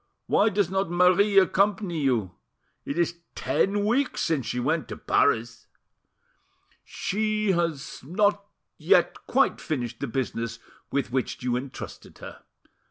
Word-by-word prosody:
Why 215 - +3
does 200 -3 0
not 190 -1 0
Marie 180 +3 +4
accompany 195 -2 +3
you? 120 -10 0 0.5
It 140 - -4
is 170 0 0 0.2
ten 205 +1 0
weeks 255 +5 +1
since 155 -7 0
she 125 - -2
went 150 +3 0
to - - -7
Paris." 115 0 +1 1.2
"She 215 0 -1
has 170 -8 -2
not 205 +6 +1 0.4
yet - - +2
quite - - +2
finished 125 -7 -3
the 140 - -3
business 115 -2 -3 0.3
with 140 -3 -1
which 130 -1 -2
you 125 -1 0
entrusted 130 +2 -7
her. - - -10
170 Hz, 130 wpm, -26 LUFS, 130-200 Hz, 1.2 s, Marie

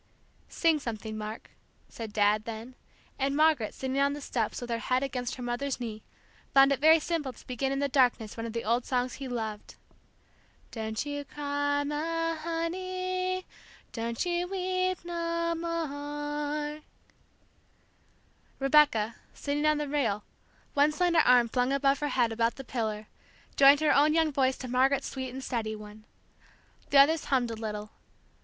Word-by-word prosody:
"Sing 325 -2 +2
something, 220 -4 -5
Mark," 215 +1 -7 0.4
said 225 -2 -7
Dad, 210 0 +2
then; 230 +2 -7 0.5
and 275 +1 0
Margaret, 305 -8 +3
sitting 265 +1 -2
on 280 0 +3
the 290 - -5
steps 235 -6 -2
with 245 -1 -6
her 230 - 0
head 255 +3 0
against 250 -2 -3
her 250 - -7
mother's 245 +3 -2
knee, 220 -3 -5 0.5
found 275 0 +7
it 275 - +1
very 320 +3 +7
simple 305 -4 -2
to - - -17
begin 265 +2 -2
in 275 - -1
the 280 +1 +1
darkness 250 -5 +2
one 230 0 -4
of 225 - -7
the 230 - -3
old 235 +3 +1
songs 250 -1 -1
he 275 - -6
loved: 220 -4 -5 1.0
"Don't 220 +2 -3
you 290 0 -4
cry, 285 0 -1
ma 330 +3 -1
honey, 370 +3 -2 0.5
Don't 230 +3 -2
you 350 0 0
weep 370 -1 -1
no 335 -1 -1
more." 295 -2 -3 1.8
Rebecca, 270 -6 +3 0.2
sitting 295 +1 -1
on 305 0 +3
the 295 0 -2
rail, 235 -8 0 0.5
one 290 +1 +4
slender 340 +1 +2
arm 250 -5 +5
flung 250 +2 0
above 275 0 +2
her 295 - -1
head 240 -4 +2
about 230 +1 +1
the 270 - -8
pillar, 220 -4 -3 0.5
joined 280 +2 +7
her 310 - +4
own 300 +3 +4
young 320 -2 +3
voice 265 -1 +2
to 255 - -7
Margaret's 265 +2 +2
sweet 260 -1 -4
and 260 +2 -7
steady 220 -4 -2
one. 210 0 -12 0.8
The 285 - +4
others 300 +3 +5
hummed 250 -4 +1
a - - -4
little. 210 -1 -5
275 Hz, 160 wpm, -29 LUFS, 235-305 Hz, 1.8 s, found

